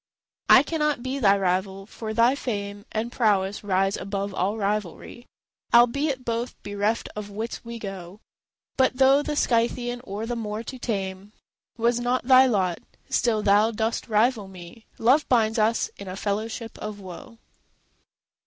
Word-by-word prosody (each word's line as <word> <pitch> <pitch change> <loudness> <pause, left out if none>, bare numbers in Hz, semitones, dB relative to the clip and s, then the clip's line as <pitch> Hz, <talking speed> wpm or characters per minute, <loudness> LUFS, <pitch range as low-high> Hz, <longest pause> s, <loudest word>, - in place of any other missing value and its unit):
I - - +8
cannot 300 -5 -1
be 260 +2 -3
thy 200 -5 +4
rival, 190 +1 -1
for 220 +1 -7
thy 230 +3 +4
fame 205 -6 -5
And 225 +2 -3
prowess 205 -5 +1
rise 195 0 +1
above 200 0 -4
all 195 +4 -1
rivalry, 210 +3 -4 0.5
Albeit 255 +2 +3
both 235 +1 -2
bereft 205 +2 -1
of 210 -1 -6
wits 220 +3 -5
we 235 0 -7
go. 195 -2 -8 0.6
But, 260 -1 +2
though 270 +2 +5
the 295 0 -3
Scythian 240 -1 0
or 205 0 -5
the 240 +1 -3
Moor 215 -1 -4
to 260 +1 -8
tame 195 -3 -4 0.4
Was 235 +1 +1
not 245 +1 0
thy 260 0 +7
lot, 185 -7 0 0.3
still 220 -3 +1
thou 205 +2 +4
dost 225 +1 -2
rival 220 -1 +2
me: 185 +4 -13
Love 265 +7 +3
binds 225 -2 +2
us 220 +2 +1
in 200 - -9
a 185 - -5
fellowship 220 +3 -4
of 210 -1 -6
woe. 200 +6 -11
220 Hz, 155 wpm, -25 LUFS, 200-240 Hz, 0.6 s, I